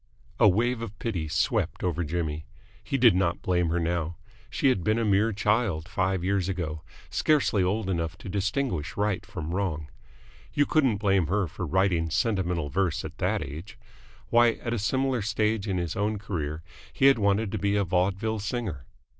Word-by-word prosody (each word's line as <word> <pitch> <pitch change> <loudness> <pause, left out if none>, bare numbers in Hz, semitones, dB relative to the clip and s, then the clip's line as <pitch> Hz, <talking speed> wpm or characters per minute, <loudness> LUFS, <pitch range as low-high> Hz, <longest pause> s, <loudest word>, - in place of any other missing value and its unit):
A 105 - +7
wave 115 +5 +1
of 110 -3 -7
pity 90 -10 -3
swept 75 -1 0
over 85 -1 0
Jimmy. 80 -1 -3 0.4
He 140 - -1
did 120 -4 +6
not 90 -2 0
blame 90 -2 +1
her 85 +2 +1
now. 85 0 -1 0.3
She 140 - +2
had 95 -9 +1
been 110 +4 +2
a 115 - +1
mere 105 +2 +3
child 105 -5 0
five 95 -2 0
years 95 -1 0
ago, 80 -5 -3 0.3
scarcely 145 -9 +2
old 95 +3 0
enough 85 -1 -2
to 100 - -11
distinguish 100 - -2
right 105 -2 0
from 90 -7 -6
wrong. 80 -6 -2 0.7
You 145 - +4
couldn't 135 -10 +2
blame 95 -4 +2
her 100 +3 +1
for 90 +2 -5
writing 90 -1 +1
sentimental 90 -4 0
verse 90 +1 0
at - - -9
that - - 0
age. 75 +8 -8 0.5
Why, 120 0 +5
at 120 +1 -4
a 120 - -1
similar 130 +3 0
stage 105 0 0
in 95 -2 0
his 85 -2 -2
own 105 +2 0
career 80 -6 -4 0.3
he 135 - +1
had 135 -3 +6
wanted 100 0 +1
to - - -2
be 100 0 +1
a 100 - +2
vaudeville 95 +4 0
singer. 100 - -4
95 Hz, 180 wpm, -27 LUFS, 85-110 Hz, 0.7 s, A